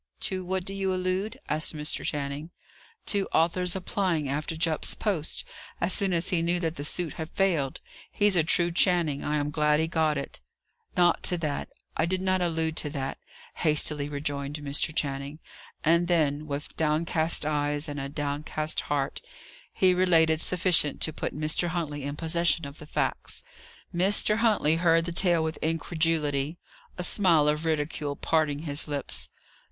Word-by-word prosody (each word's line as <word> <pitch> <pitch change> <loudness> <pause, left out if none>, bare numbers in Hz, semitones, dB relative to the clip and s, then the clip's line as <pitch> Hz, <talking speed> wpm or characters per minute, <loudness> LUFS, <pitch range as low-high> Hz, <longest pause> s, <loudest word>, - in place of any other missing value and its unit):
To 185 -1 -2
what 185 0 -2
do 195 - -4
you 195 -1 -1
allude?" 185 +6 -2
asked 155 +1 0
Mr. 150 0 -1
Channing. 145 +2 -3 0.6
"To 200 -2 +1
Arthur's 175 +2 +2
applying 180 -5 -1
after 150 +4 -2
Jupp's 160 -1 +1
post, 185 -8 -1 0.4
as 175 +2 +3
soon 195 -1 +3
as 170 -1 +1
he 180 -4 +1
knew 175 +1 +1
that 165 -2 -2
the 145 - -5
suit 165 +2 0
had 160 - -5
failed. 165 -10 0 0.3
He's 205 -2 +3
a 170 - +4
true 170 +2 +2
Channing. 170 -5 +2
I 150 - -1
am 145 0 -1
glad 150 0 +2
he 160 - +1
got 160 -2 +1
it." 140 - -6 0.6
"Not 175 -1 +4
to 180 - +2
that 145 -2 -3 0.3
I 160 - +1
did 185 +1 0
not 185 0 +1
allude 160 -2 -1
to 150 - -1
that," 135 -2 -4 0.4
hastily 150 -2 0
rejoined 145 -1 -3
Mr. 145 +1 0
Channing. 140 -1 -3 0.5
And 170 +2 +3
then, 155 -3 +1
with 145 0 -5
downcast 160 0 +1
eyes, 145 0 0
and 145 0 -5
a 135 0 -4
downcast 145 +1 -2
heart, 140 -2 -1 0.5
he 185 -1 +3
related 165 -3 +3
sufficient 180 -5 +2
to 160 - +2
put - - -4
Mr. 155 +3 +1
Huntley 155 -5 -3
in 145 +1 -3
possession 165 0 +1
of 140 +1 -10
the 150 - -11
facts. - - -2 0.5
Mr. 200 +4 +2
Huntley 210 -9 +3
heard 165 -1 +3
the 170 - -3
tale 170 -1 +2
with 160 0 -3
incredulity, 160 -2 0 0.4
a 180 - -1
smile 170 -6 +4
of 150 +2 0
ridicule 150 -2 -1
parting 155 -2 0
his 145 -1 +2
lips. 145 -2 -3
160 Hz, 165 wpm, -27 LUFS, 150-175 Hz, 0.6 s, a